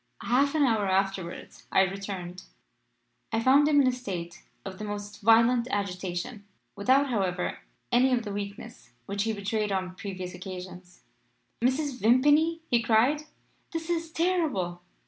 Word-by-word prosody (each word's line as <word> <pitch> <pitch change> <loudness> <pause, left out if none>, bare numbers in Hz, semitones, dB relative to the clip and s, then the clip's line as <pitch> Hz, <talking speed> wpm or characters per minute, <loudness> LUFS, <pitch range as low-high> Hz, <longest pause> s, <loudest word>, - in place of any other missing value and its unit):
"Half 280 +5 +2
an 305 - +3
hour 220 -6 +2
afterwards 190 -2 -2
I - - +5
returned. 190 -2 -5 0.9
I 225 - +1
found 270 +5 +5
him 295 -1 +4
in 275 - +5
a - - +4
state 185 -9 -6 0.2
of 190 -1 -7
the - - -5
most 205 0 -6
violent 230 +3 +5
agitation, 195 0 -3 0.3
without, 260 +7 +3
however, 185 -5 -1 0.3
any 250 +2 +4
of 245 -2 +1
the 205 -2 -5
weakness 205 - -7
which 200 - -2
he 225 - 0
betrayed 210 +1 -2
on 185 -1 -2
previous 185 -2 -6
occasions. 180 -1 -9 0.6
"'Mrs. 265 +1 0
Vimpany,' 295 +8 +4
he 240 -1 +2
cried, 240 +7 +2 0.5
'this 330 0 -3
is 330 -1 -2
terrible! 310 - 0
215 Hz, 145 wpm, -28 LUFS, 190-260 Hz, 0.9 s, I